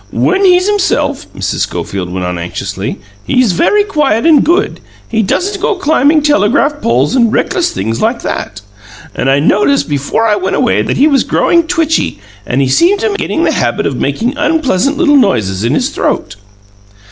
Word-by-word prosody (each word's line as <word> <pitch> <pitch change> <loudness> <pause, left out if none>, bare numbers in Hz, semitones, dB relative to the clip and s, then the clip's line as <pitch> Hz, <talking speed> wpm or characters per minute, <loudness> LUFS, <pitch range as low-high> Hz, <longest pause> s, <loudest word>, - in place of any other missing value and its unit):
"When 385 +1 +1
he's 365 0 +4
himself," 410 -1 -1
Mrs. - - -3
Schofield 90 -3 -4
went 90 0 -3
on 90 -1 -3
anxiously, 85 +1 -5 0.3
"he's 235 - +1
very 415 - +2
quiet 295 - 0
and 315 -4 +5
good; 345 +4 0 0.3
he 225 -1 0
doesn't 390 - -2
go 445 0 0
climbing 305 -3 +2
telegraph 290 +1 +1
poles 130 - +1
and 235 -4 +3
reckless 340 +9 0
things 115 - -3
like 235 +2 -1
that. 105 -1 -5 0.5
And 135 - -1
I 135 - +3
noticed 210 - +1
before 145 +9 -1
I 210 -2 +2
went 190 -1 -2
away 250 - +1
that - - -2
he 280 - +4
was 280 -3 +3
growing 335 -1 +1
twitchy, 325 - 0 0.3
and 135 +2 0
seemed 375 - +3
to 445 - 0
be 400 - -3
getting 330 - -2
the - - +2
habit 120 -1 -1
of 135 - -1
making 225 - -2
unpleasant 290 - 0
little 295 -4 +3
noises 110 - 0
in 115 - 0
his - - 0
throat." 100 - -2
260 Hz, 180 wpm, -12 LUFS, -, 0.5 s, and